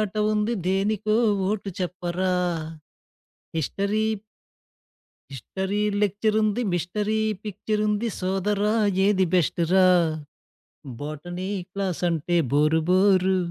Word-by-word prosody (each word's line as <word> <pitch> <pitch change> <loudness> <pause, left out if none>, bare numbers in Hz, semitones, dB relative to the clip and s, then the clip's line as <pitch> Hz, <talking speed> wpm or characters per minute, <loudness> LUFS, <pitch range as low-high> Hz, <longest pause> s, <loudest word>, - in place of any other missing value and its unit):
ఆట 210 -1 -2 0.2
ఉంది, 215 +2 0
దేనికో 210 +2 +1 0.3
ఓటు 205 -2 -3
చెప్పరా? 180 0 -2 1.3
హిస్టరీ... 200 +7 -1 1.3
హిస్టరీ 190 - -3 0.2
లెక్చరుంది, 215 +2 +1
మిస్టరీ 210 +5 -1 0.2
పిక్చరుంది, 210 +1 -1
సోదరా 200 +3 0 0.3
ఏది 195 -2 +3
బెస్టురా? 180 +2 +3 1.1
Botany 175 +5 -5 0.2
క్లాసంటే 175 -3 -1 0.2
bore 150 +3 +3
bore. 190 0 +4
190 Hz, 75 wpm, -24 LUFS, 180-210 Hz, 1.3 s, bore